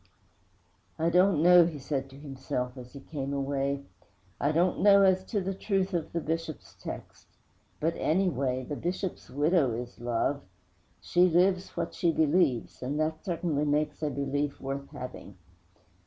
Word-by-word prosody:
'I 165 +1 +1
don't 180 -2 +4
know,' 175 -1 +8
he 160 -3 -5
said 135 -1 -3
to 135 - -14
himself, 135 -3 -4
as 125 -1 -11
he 140 - -9
came 140 -2 -5
away, 140 0 -1 0.6
'I 145 - +2
don't 175 +3 +2
know 200 0 +7
as 190 -1 +4
to 205 -1 -1
the 190 +1 -2
truth 195 -1 -1
of 170 -3 -2
the 170 - -1
Bishop's 165 -1 -4
text; - - -8 0.5
but, 165 +2 +1
anyway, 140 -7 +1
the 145 +4 -5
Bishop's 180 +4 -4
widow 145 -2 +2
is 120 +2 -6
love. 120 +4 0 0.6
She 180 +1 +3
lives 180 +2 +2
what - - -2
she 170 - +1
believes, 155 -6 +1
and 140 +4 -2
that 155 0 -1
certainly 170 -5 -1
makes 150 +1 0
a 155 - 0
belief 140 +1 -2
worth 140 +1 -5
having.' 125 0 -9
150 Hz, 155 wpm, -29 LUFS, 135-175 Hz, 0.6 s, know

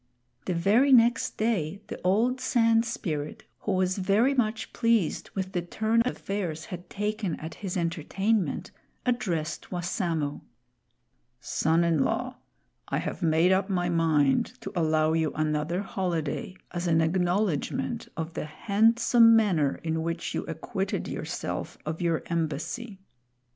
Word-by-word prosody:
The 180 - -1
very 215 +11 +4
next 240 -1 +4
day 200 -6 0
the - - -8
old 230 +8 +2
Sand 230 -1 +3
Spirit, 155 -10 -4 0.2
who 205 - -2
was 185 +1 +1
very 205 +8 +3
much 220 -4 -1
pleased 230 -8 +1
with 190 -1 -2
the 180 - -1
turn 220 +6 +1
affairs 195 -9 -3
had 175 0 -8
taken 210 -3 -2
at 160 +1 -6
his 190 -2 -3
entertainment, 180 +5 -1 0.3
addressed 185 -11 -1
Wassamo: 170 -4 -2 1.0
"Son 160 +6 +1
in 165 -4 +3
law, - - -2 0.5
I - - -1
have - - -4
made 165 +2 +3
up 190 +1 +2
my 175 -2 0
mind 165 - +2
to - - -6
allow 155 -2 +2
you 160 -2 +1
another 155 +4 0
holiday 180 -3 -2 0.2
as 175 0 -3
an 165 -1 +3
acknowledgment 175 -4 0
of 165 0 -4
the - - -3
handsome 230 +7 +4
manner 175 -11 +2
in 160 0 -1
which 165 +1 -3
you - - -2
acquitted - - -3
yourself - - -4
of 160 +2 -4
your 170 -2 +1
embassy. 170 - -3
180 Hz, 135 wpm, -27 LUFS, 160-215 Hz, 1.0 s, very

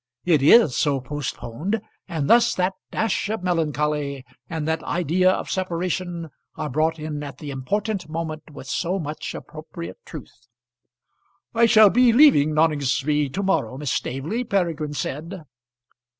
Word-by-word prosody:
It 165 -5 +3
is 155 - +6
so 140 -2 +1
postponed, 145 - -4 0.3
and 155 -4 -2
thus 235 0 +5
that 185 +1 0 0.2
dash 220 -2 -1
of 220 -4 -3
melancholy, 150 -5 -1 0.2
and 160 -2 -3
that 160 0 0
idea 180 +2 +1
of 185 - -1
separation 175 -2 -3 0.2
are 150 -2 -4
brought 160 +4 +1
in 150 -1 -5
at 145 -2 -7
the 150 -3 -7
important 195 - -2
moment 155 -1 -5
with 140 - -10
so 175 +7 -1
much 155 -4 -5
appropriate 160 +2 -9
truth. 125 -5 -11 1.1
"I 230 0 +4
shall 215 -3 +7
be 250 0 +5
leaving 235 - +6
Noningsby 150 -1 +1
to 200 +8 -3
morrow, 190 -9 0
Miss 145 -2 -3
Staveley," 155 - -2
Peregrine 170 -9 -1
said. 160 +6 -5
160 Hz, 140 wpm, -23 LUFS, 145-185 Hz, 1.1 s, shall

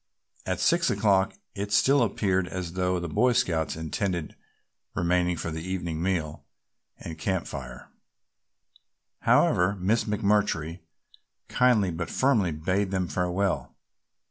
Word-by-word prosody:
At - - -1
six - - +3
o'clock 100 -1 +2 0.2
it 100 0 -4
still 135 +8 +4
appeared 95 -4 +1
as 90 -1 -5
though 90 0 0
the 85 - -4
Boy 120 +9 +2
Scouts 80 -8 0
intended 80 +1 -3 0.6
remaining 90 0 +1
for 80 - -4
the 80 0 -5
evening 85 -2 -3
meal 85 -5 -2 0.5
and 80 -1 -8
camp 95 0 -1
fire; 65 -3 -8 1.3
however, 90 +3 +3
Miss 100 +5 +1
McMurtry 100 -6 0 0.7
kindly 115 -7 +3
but 85 +1 -4
firmly 125 -9 +2
bade 95 +6 -1
them 95 -1 -1
farewell. 90 +5 -1
90 Hz, 120 wpm, -27 LUFS, 85-100 Hz, 1.3 s, still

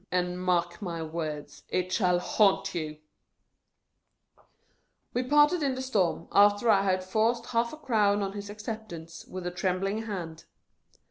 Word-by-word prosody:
AND, 180 0 -1
MARK 175 -1 0
MY 170 -4 -4
WORDS, 155 -2 -5
IT 185 0 -1
SHALL 180 -4 +3
HAUNT 195 +1 +2
YOU! 155 -3 -4 1.0
" - - -38
We 245 - +1
parted 295 +6 +4
in 275 -3 +1
the 260 - -4
storm, 190 -10 0
after 205 +3 +5
I 195 -2 +5
had 185 -1 +1
forced 225 +5 +1
half 235 0 0
a 310 - -8
crown 210 -8 +2
on 195 - -2
his 205 0 -7
acceptance, 210 -6 -7
with 185 -1 -7
a 180 - -2
trembling 195 +4 -1
hand. 170 -6 -6
195 Hz, 150 wpm, -28 LUFS, 175-220 Hz, 1.0 s, after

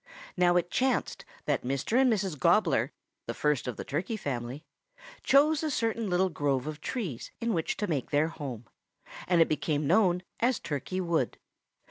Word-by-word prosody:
"Now 175 -1 +4
it 175 0 +1
chanced 260 - 0 0.2
that - - +1
Mr. 140 - +1
and 260 -2 +4
Mrs. 195 -6 0
Gobbler, - - +3 0.4
the - - -3
first 150 -4 0
of 125 - -4
the - - -4
Turkey 180 +10 -2
family, 130 - -4 0.6
chose 290 +2 +4
a 315 - -1
certain 230 -5 -1
little 185 +1 +2
grove 140 -5 0
of 155 0 -6
trees 190 - -4
in 230 -1 0
which 165 -3 -1
to 210 - -1
make 155 -9 -2
their 150 +2 +2
home, 135 -8 -7 0.6
and 175 -2 +4
it - - -5
became 150 0 -1
known 180 +2 +3 0.2
as 240 0 +2
Turkey 155 +5 -3
Wood. 165 -8 0
170 Hz, 170 wpm, -29 LUFS, 145-215 Hz, 0.6 s, Now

